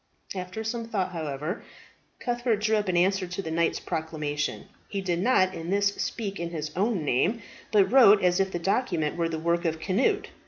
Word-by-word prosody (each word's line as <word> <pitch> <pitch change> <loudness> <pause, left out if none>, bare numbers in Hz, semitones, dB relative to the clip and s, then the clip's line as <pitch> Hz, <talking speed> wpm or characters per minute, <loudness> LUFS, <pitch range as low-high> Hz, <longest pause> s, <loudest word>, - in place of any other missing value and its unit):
After 185 +3 -5
some 230 +1 -3
thought, 200 -5 -2
however, 155 +1 -4 0.6
Cuthbert 240 -2 0
drew 215 +1 +1
up 210 -1 -1
an 175 - +1
answer 190 +1 +2
to 180 +2 -6
the 165 -4 -3
knight's 165 +1 +1
proclamation. 150 -2 -3 0.2
He 200 - -3
did 180 -3 -1
not 185 -3 +3
in 165 -1 -6
this 200 +1 +3
speak 200 -3 -4
in 170 0 -3
his 155 -3 -4
own 195 -3 0
name, 185 - +1 0.3
but 205 -2 +4
wrote 220 -7 +7
as 180 0 +3
if 190 0 +2
the - - -2
document 175 - 0
were 170 -1 0
the 160 - -3
work 170 +2 0
of 160 -2 -1
Cnut. 245 - +1
185 Hz, 195 wpm, -27 LUFS, 165-210 Hz, 0.6 s, wrote